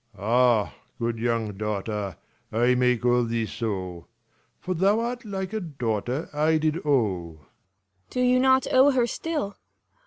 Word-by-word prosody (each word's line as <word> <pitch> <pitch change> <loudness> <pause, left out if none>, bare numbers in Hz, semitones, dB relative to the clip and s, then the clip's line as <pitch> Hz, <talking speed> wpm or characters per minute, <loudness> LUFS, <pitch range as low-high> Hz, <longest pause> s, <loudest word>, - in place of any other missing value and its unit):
1 - - -23
2 - - -16
5 - - -9
Lelr. - - -4
Ah, 120 -4 +3 0.2
good 115 -1 -2
young 115 -2 -1
daughter, 105 -1 -3 0.3
I 120 +3 +3
may 125 0 +3
call 120 +1 +2
thee 115 -1 -1
so; 95 -7 -4 0.5
For 185 - -3
thou 195 +5 +3
art 240 +1 -3
like 190 -1 -4
a 220 - -1
daughter 130 - -3
I 155 +2 +2
did 155 0 0
owe. 100 - 0
Cor. 75 - -25 0.6
Do 250 - -2
you 250 0 +4
not 260 0 +4
owe 265 +2 +6
her 255 -4 +3
still 290 -6 -3
125 Hz, 175 wpm, -25 LUFS, -, 0.6 s, owe